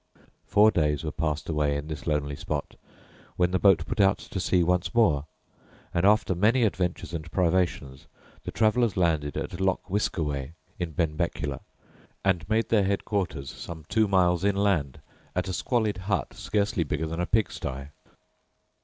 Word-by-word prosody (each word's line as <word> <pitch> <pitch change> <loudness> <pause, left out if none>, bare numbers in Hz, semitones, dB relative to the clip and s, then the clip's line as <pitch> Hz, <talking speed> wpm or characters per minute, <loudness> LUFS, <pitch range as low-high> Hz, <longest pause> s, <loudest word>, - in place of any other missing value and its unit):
Four 105 +1 +5
days 75 -4 +1
were 80 - -3
passed 75 -2 -2
away 75 -2 0
in 70 - -5
this 75 -1 -7
lonely 75 -2 0
spot, 75 0 -4 0.6
when 90 0 +2
the 95 - +1
boat 95 -5 +4
put 105 - -4
out 95 -1 +4
to 95 - -6
sea 90 0 +2
once 90 +5 0
more, 80 -11 +3 0.7
and 85 +3 +3
after 105 -2 +3
many 110 +8 +3
adventures 90 -6 -1
and 80 -1 -5
privations 85 -7 0 0.4
the - - -6
travellers 110 -1 +2
landed 80 -5 +1
at 90 - -4
Loch 95 -1 0
Wiskaway, 75 -8 -1 0.3
in 85 -3 -3
Benbecula, 75 -3 -1 0.7
and 90 -3 +1
made 110 +1 +1
their 110 -3 +4
headquarters 95 -8 -2
some 80 -3 -9
two 110 0 +3
miles 90 -2 +3
inland 100 -8 +1 0.3
at 90 +1 -1
a 95 - -3
squalid 110 +1 0
hut 95 +1 -2
scarcely 105 -2 0
bigger 75 +1 -2
than 80 +1 -4
a 90 - -1
pigstye. 70 -10 -2
90 Hz, 155 wpm, -27 LUFS, 75-100 Hz, 0.7 s, Four